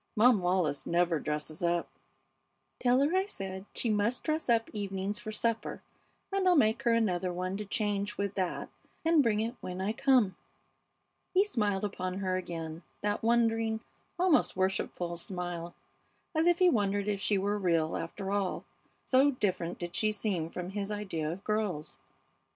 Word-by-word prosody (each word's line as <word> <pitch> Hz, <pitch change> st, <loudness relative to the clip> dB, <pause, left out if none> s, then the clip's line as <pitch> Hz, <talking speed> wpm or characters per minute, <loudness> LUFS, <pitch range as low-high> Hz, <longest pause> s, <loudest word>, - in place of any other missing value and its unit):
"Mom 230 Hz, 0 st, +6 dB
Wallis 175 Hz, -5 st, 0 dB
never 170 Hz, -1 st, +2 dB
dresses 150 Hz, +1 st, -4 dB
up." 170 Hz, 0 st, +1 dB, 0.9 s
"Tell 250 Hz, +1 st, +4 dB
her 300 Hz, +6 st, +2 dB
I 380 Hz, +1 st, +2 dB
said 190 Hz, -, -6 dB
she 230 Hz, -, +1 dB
must 210 Hz, +4 st, +1 dB
dress 310 Hz, -3 st, -1 dB
up 230 Hz, -1 st, +3 dB
evenings 200 Hz, 0 st, -3 dB
for 215 Hz, -, -6 dB
supper, 225 Hz, +1 st, -2 dB, 0.5 s
and 390 Hz, -1 st, +2 dB
I'll 360 Hz, -, +6 dB
make 225 Hz, -5 st, +3 dB
her 240 Hz, -3 st, +2 dB
another 185 Hz, -5 st, +1 dB
one 185 Hz, +2 st, -2 dB
to 210 Hz, -, -4 dB
change 205 Hz, -1 st, -1 dB
with 200 Hz, -1 st, -1 dB
that 185 Hz, -3 st, -2 dB, 0.3 s
and 330 Hz, -2 st, +5 dB
bring 220 Hz, -5 st, +2 dB
it 230 Hz, +2 st, -1 dB
when 180 Hz, 0 st, -5 dB
I 195 Hz, +3 st, 0 dB
come." 240 Hz, -7 st, +3 dB, 1.0 s
He 385 Hz, -, +7 dB
smiled 210 Hz, -, 0 dB
upon 185 Hz, -2 st, -3 dB
her 190 Hz, -1 st, -1 dB
again, 165 Hz, -3 st, -4 dB, 0.2 s
that 205 Hz, 0 st, 0 dB
wondering, 225 Hz, -1 st, +2 dB, 0.4 s
almost 360 Hz, -3 st, +3 dB
worshipful 185 Hz, -2 st, -1 dB
smile, 175 Hz, -1 st, -4 dB, 0.6 s
as 320 Hz, +1 st, +2 dB
if 350 Hz, -1 st, +5 dB
he 365 Hz, -, +5 dB
wondered 205 Hz, -, +2 dB
if 200 Hz, -1 st, -1 dB
she 205 Hz, 0 st, +2 dB
were 205 Hz, +2 st, 0 dB
real, 165 Hz, -4 st, +1 dB
after 190 Hz, +4 st, -4 dB
all, 200 Hz, -2 st, -1 dB, 0.4 s
so 270 Hz, +2 st, +5 dB
different 185 Hz, -9 st, -1 dB
did 175 Hz, 0 st, -5 dB
she 215 Hz, -1 st, +1 dB
seem 195 Hz, -6 st, -2 dB
from 180 Hz, +1 st, -5 dB
his 200 Hz, 0 st, -3 dB
idea 185 Hz, -7 st, -2 dB
of 190 Hz, +4 st, -7 dB
girls. 210 Hz, -8 st, -2 dB
205 Hz, 165 wpm, -31 LUFS, 180-230 Hz, 1.0 s, He